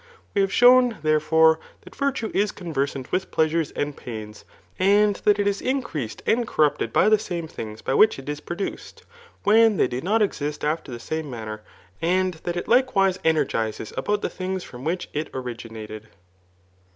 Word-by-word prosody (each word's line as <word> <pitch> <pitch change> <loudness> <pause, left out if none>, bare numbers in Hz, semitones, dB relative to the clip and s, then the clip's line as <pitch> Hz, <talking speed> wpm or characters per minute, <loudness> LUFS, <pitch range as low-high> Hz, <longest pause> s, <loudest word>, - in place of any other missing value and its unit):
We 200 - +2
have 195 0 +1
shown, 245 0 +6
therefore, 160 +1 +4 0.2
that - - -15
virtue 270 -5 -1
is 205 +1 +1
con 175 -4 -8
versant 135 -2 -2
with 190 +1 -1
pleasures 160 -1 +1
and 145 -1 -3
pains, 110 -3 -8 0.3
and 205 +2 +4
that 210 -1 +5
it 205 - 0
is 200 0 0
increased 240 - -3
and 235 0 +2
corrupted 150 - +1
by - - +4
the 215 0 +5
same 175 -6 -4
things 110 -7 -8
by - - -1
which 215 +9 +5
it 135 - -10
is 150 0 -3
produced, 175 +5 -6 0.4
when 220 0 +5
they - - +3
do 125 +1 -4
not 215 +5 +2
exist 150 -7 -3
after 155 -2 -2
the 120 - -6
same 160 +6 -4
maimer; 110 -3 -6 0.4
and 180 0 0
diat 175 - -3
it 175 - -4
likewise 200 -7 +3
energizes 115 -9 0
about 205 0 -1
the - - 0
things 185 0 -4
from 125 0 -10
which 170 +4 -2
it 150 +1 -3
origfaiated. 115 -4 -7
165 Hz, 175 wpm, -24 LUFS, 135-205 Hz, 0.4 s, shown